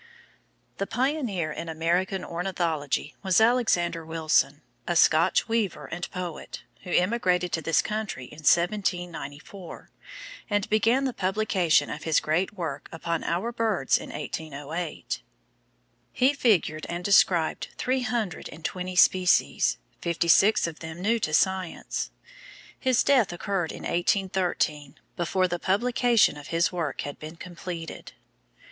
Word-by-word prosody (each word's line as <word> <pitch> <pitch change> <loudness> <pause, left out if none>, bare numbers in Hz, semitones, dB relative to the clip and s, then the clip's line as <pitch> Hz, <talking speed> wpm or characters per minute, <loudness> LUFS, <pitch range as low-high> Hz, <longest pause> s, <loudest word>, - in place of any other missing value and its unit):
The 195 - -1
pioneer 240 - -1
in 165 +2 -6
American 175 +4 0
ornithology 170 -5 -2
was 190 -1 +3
Alexander 220 -8 +2
Wilson, 160 -2 +1 0.2
a 175 - 0
Scotch 165 +2 +4
weaver 225 -5 -1
and 175 0 -5
poet, 180 -4 -6 0.2
who 180 - -10
emigrated 180 -2 +1
to 160 - -1
this 165 0 +2
country 215 -10 -4
in 150 - -13
1794, 175 -1 -1 0.6
and 205 -1 0
began 225 +5 +3
the 260 - -1
publication 190 -4 +1
of - - -6
his 160 -2 +2
great 160 +5 0
work 165 -8 -5
upon 165 0 -3
our 185 +8 -1
birds 220 - +1
in - - -9
1808. 155 +2 -5 0.9
He 260 - +3
figured 185 - +1
and 175 +1 -4
described 180 -4 +3
three 260 +1 0
hundred 230 -8 -2
and 160 +1 -11
twenty 185 0 -3
species, 180 - +4 0.2
fifty 170 0 -1
six 195 +6 +5
of 165 -2 -5
them 160 +1 -8
new 225 +5 +1
to 155 - -2
science. 190 +2 0 0.7
His 255 -1 +2
death 255 -9 +3
occurred 175 -1 -2
in - - -9
1813, 175 -5 0 0.2
before 185 +2 +1
the 175 -1 -3
publication 235 - +3
of 145 - -10
his 165 +1 +1
work 170 -5 -3
had 145 - -6
been 155 +2 -8
completed. 170 -1 -7
180 Hz, 130 wpm, -26 LUFS, 165-205 Hz, 0.9 s, six